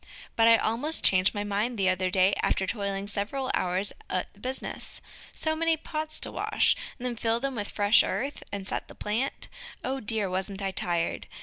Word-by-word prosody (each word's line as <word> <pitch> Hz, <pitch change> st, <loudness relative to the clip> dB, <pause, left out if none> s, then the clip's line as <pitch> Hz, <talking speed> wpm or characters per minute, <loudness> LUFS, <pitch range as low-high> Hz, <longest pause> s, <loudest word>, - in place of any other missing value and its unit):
But 225 Hz, 0 st, +5 dB
I 230 Hz, 0 st, +8 dB
almost 250 Hz, +10 st, +1 dB
changed 185 Hz, +1 st, +5 dB
my 205 Hz, -, -1 dB
mind 210 Hz, +4 st, -1 dB
the 195 Hz, -2 st, +2 dB
other 185 Hz, 0 st, +2 dB
day 190 Hz, +1 st, +4 dB
after 190 Hz, -, +1 dB
toiling 200 Hz, -1 st, -2 dB
several 210 Hz, +6 st, -2 dB
hours 185 Hz, +3 st, +1 dB, 0.2 s
at 185 Hz, -, -2 dB
the 200 Hz, -, -21 dB
business. 260 Hz, +4 st, -3 dB, 0.3 s
So 315 Hz, 0 st, -1 dB
many 330 Hz, 0 st, +2 dB
pots 310 Hz, 0 st, -3 dB
to -, -, -2 dB
wash! -, -, +2 dB, 0.2 s
then 245 Hz, -1 st, -3 dB
fill 230 Hz, +1 st, +1 dB
with 245 Hz, -6 st, -3 dB
fresh 205 Hz, +1 st, +5 dB
earth, 275 Hz, +4 st, -2 dB
and 200 Hz, -1 st, -4 dB
set -, -, -2 dB
the -, -, -13 dB
plant. 225 Hz, +6 st, -2 dB, 0.4 s
O 265 Hz, +1 st, -2 dB
dear, 215 Hz, -3 st, 0 dB
wasn't 190 Hz, +2 st, -3 dB
I 195 Hz, -, 0 dB
tired! 175 Hz, -2 st, -2 dB
210 Hz, 185 wpm, -28 LUFS, 195-255 Hz, 0.4 s, I